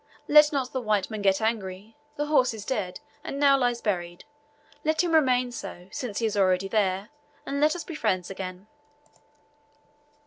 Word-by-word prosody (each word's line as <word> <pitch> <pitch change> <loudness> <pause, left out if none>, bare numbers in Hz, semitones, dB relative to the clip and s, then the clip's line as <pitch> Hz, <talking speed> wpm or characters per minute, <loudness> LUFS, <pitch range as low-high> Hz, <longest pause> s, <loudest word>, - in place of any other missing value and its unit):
Let 300 0 +7
not 270 -4 -1
the 260 - -1
white 215 -3 0
man 215 -1 -4
get 195 +1 +2
angry. 215 -1 -3 0.2
The 295 - -1
horse 260 -6 +2
is 210 - -8
dead, 195 -8 -3 0.2
and 275 - -5
now 280 -1 +6
lies 245 -3 0
buried; 175 -4 -3 0.6
let 315 +3 +2
him 340 -2 -1
remain 255 -5 +3
so, 185 -5 -8
since 235 -6 -5
he 230 - 0
is 215 - -1
already 190 -1 +2
there, 195 -1 0 0.4
and 280 +1 -2
let 305 +2 +3
us 345 - -5
be 335 - -8
friends 185 - -1
again." 185 0 -7
220 Hz, 175 wpm, -26 LUFS, 195-275 Hz, 0.6 s, Let